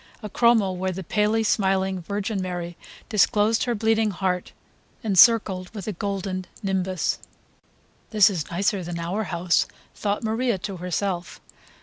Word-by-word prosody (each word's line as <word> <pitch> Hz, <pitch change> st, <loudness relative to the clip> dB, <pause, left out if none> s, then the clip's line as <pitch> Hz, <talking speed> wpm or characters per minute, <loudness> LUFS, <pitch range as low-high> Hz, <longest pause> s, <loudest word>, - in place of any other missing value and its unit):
a 210 Hz, -, -5 dB
chromo 235 Hz, -5 st, +4 dB
where 185 Hz, +1 st, -2 dB
the 190 Hz, +1 st, -6 dB
palely 210 Hz, +5 st, +1 dB
smiling 190 Hz, -3 st, +1 dB
Virgin 200 Hz, +2 st, -3 dB
Mary 175 Hz, -2 st, -4 dB, 0.3 s
disclosed 210 Hz, +1 st, +3 dB
her 240 Hz, -2 st, 0 dB
bleeding 220 Hz, 0 st, +2 dB
heart 185 Hz, -2 st, -2 dB, 0.5 s
encircled 195 Hz, -3 st, +5 dB
with 200 Hz, -, -6 dB
a -, -, 0 dB
golden 190 Hz, -1 st, -3 dB, 0.2 s
nimbus. 190 Hz, -2 st, -1 dB, 0.9 s
"This 210 Hz, -2 st, +6 dB
is 180 Hz, -7 st, -2 dB
nicer 195 Hz, +2 st, 0 dB
than 170 Hz, 0 st, -5 dB
our 180 Hz, +6 st, -2 dB
house," 170 Hz, -2 st, +1 dB, 0.3 s
thought 205 Hz, +1 st, -2 dB
Maria 225 Hz, 0 st, 0 dB
to 190 Hz, +1 st, -6 dB
herself. 180 Hz, 0 st, -3 dB
195 Hz, 135 wpm, -24 LUFS, 180-215 Hz, 0.9 s, This